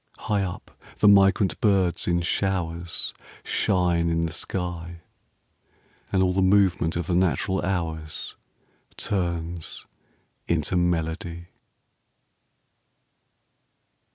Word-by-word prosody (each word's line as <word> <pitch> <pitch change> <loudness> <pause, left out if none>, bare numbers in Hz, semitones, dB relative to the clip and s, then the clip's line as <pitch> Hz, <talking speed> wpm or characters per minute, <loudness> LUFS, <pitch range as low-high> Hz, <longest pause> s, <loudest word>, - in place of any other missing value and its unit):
High 105 -2 0
up 95 -2 -5 0.3
the - - +4
migrant 95 -2 +5
birds 95 -5 +2
in 85 0 +1
showers 85 -2 -2 0.3
Shine 85 -3 +1
in 85 0 +1
the 80 - -4
sky, 85 -2 -4 1.1
And 95 -1 +3
all 90 -1 +2
the 95 - +1
movement 95 -4 +3
of 85 -1 -2
the 90 - -1
natural 95 +2 +1
hours 80 -4 -3 0.6
Turns 85 -3 -3 0.6
into 85 +1 0
melody. 85 0 -1
85 Hz, 95 wpm, -25 LUFS, 85-95 Hz, 1.1 s, migrant